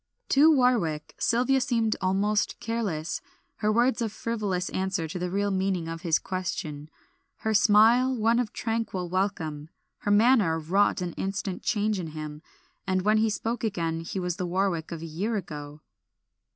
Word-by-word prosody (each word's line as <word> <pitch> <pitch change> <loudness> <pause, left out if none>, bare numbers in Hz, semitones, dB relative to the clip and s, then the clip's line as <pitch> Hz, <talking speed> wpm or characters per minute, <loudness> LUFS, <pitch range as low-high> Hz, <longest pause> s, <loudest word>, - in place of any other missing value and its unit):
To 300 +4 +6
Warwick, 240 - +1
Sylvia 255 +3 +2
seemed 230 -3 +1
almost 200 +3 +1
careless, 200 -9 -2 0.4
her 210 - +1
words 240 +2 +2
a 225 - 0
frivolous 210 -4 -2
answer 190 -3 -2
to 175 +3 -5
the 180 0 -2
real 200 +2 0
meaning 190 -3 0
of 165 0 -5
his 165 -3 +2
question, 155 -5 -4 0.5
her 220 - 0
smile 225 +5 +5
one 230 +1 +2
of 240 -4 -1
tranquil 225 -6 -3
welcome. 165 -6 -2 0.3
Her - - -3
manner 205 -5 +4
wrought 185 +5 +1
an 175 -2 -4
instant 195 -1 -3
change 210 -2 0
in 170 - -4
him, 150 0 -6 0.5
and 185 -1 +1
when 215 +2 +3
he 220 +1 +3
spoke 230 +3 -3
again 170 -6 -1
he 165 +3 -4
was 180 -1 -2
the 180 - -2
Warwick 175 -3 -1
of 165 -1 -5
a - - -4
year 190 +8 -2
ago. 150 -6 -6
195 Hz, 165 wpm, -27 LUFS, 170-225 Hz, 0.5 s, To